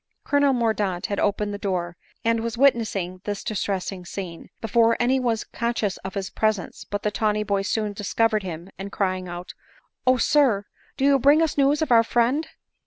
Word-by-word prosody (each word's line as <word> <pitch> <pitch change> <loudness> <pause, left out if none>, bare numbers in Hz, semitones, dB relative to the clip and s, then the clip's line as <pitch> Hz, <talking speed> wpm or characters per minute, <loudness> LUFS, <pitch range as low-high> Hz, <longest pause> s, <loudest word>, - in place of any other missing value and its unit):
* - - -52
Colonel 285 -1 +3
Mordaunt 215 -7 0
had 200 - -2
opened 205 0 0
the 205 - -5
door, 175 -4 -2 0.3
and 230 0 +3
was 230 +1 -3
wit 275 +2 +6
nessing 185 -6 -4
this 205 -1 -4
distressing 195 -3 -3
scene, 175 -1 -7
before 230 +1 +3
any 255 +2 +2
one 245 -2 +1
was 225 - -4
con 235 0 -3
scious 205 -5 -1
of 190 0 -6
his 195 -1 -3
presence; 215 -4 -1
but 205 0 -5
the 210 - 0
tawny 210 0 0
boy 200 -2 0
soon 210 +1 -1
discovered 215 +2 +1
him, 175 0 -7
and 200 +1 -6
crying 185 -2 -1
out 175 +1 -7 0.2
— - - -30
" - - -46
Oh! 255 0 +5
sir, 250 -8 +3 0.3
do 270 - +1
you 280 -1 +5
bring 285 +4 +5
us 320 - 0
news 285 +2 +3
of 310 - -3
our 230 -1 +7
friend 245 +7 +1
215 Hz, 210 wpm, -24 LUFS, 195-240 Hz, 0.3 s, our